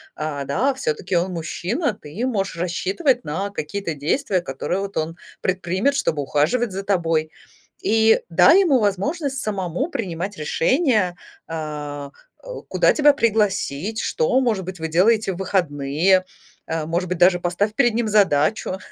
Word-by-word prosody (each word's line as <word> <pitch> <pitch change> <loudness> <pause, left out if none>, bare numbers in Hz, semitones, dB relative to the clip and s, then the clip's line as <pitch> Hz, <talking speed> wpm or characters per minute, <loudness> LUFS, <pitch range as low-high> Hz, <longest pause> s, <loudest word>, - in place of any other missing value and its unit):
А, 150 -2 -3
да, 225 - 0
всё-таки 180 - -2
он 175 +2 +1
мужчина, 180 - -2
ты 155 +11 -6
можешь 195 -8 -2
рассчитывать 195 - 0
на 190 +7 -3
какие-то 200 0 -4
действия, 180 - 0
которые 170 +5 -3
вот 200 0 -5
он 160 +1 -2 0.2
предпримет, 185 +8 0
чтобы 155 - 0
ухаживать 160 - +1
за 195 - -4
тобой. 165 -5 0 0.5
И 225 - +3
дай 370 - +6
ему 290 -9 +3
возможность 270 - -1
самому 200 - -2
принимать 195 - -4
решения, 210 - +1 0.3
а, 150 -3 -5 0.3
у - - -8
куда - - +2
тебя 295 -1 +5
пригласить, 210 - 0
что, 470 - +1
может 220 -7 0
быть, 180 -1 -7
вы 160 - -2
делаете 200 +6 +3
в 175 - -8
выходные, 180 0 +1 0.4
а, 160 -1 -2
может 170 +2 -2
быть, 185 - -2
даже 180 +1 +5
поставь 180 +5 -1
перед 240 -3 +3
ним 230 0 0
задачу, 190 -2 +2
190 Hz, 145 wpm, -22 LUFS, 165-225 Hz, 0.5 s, дай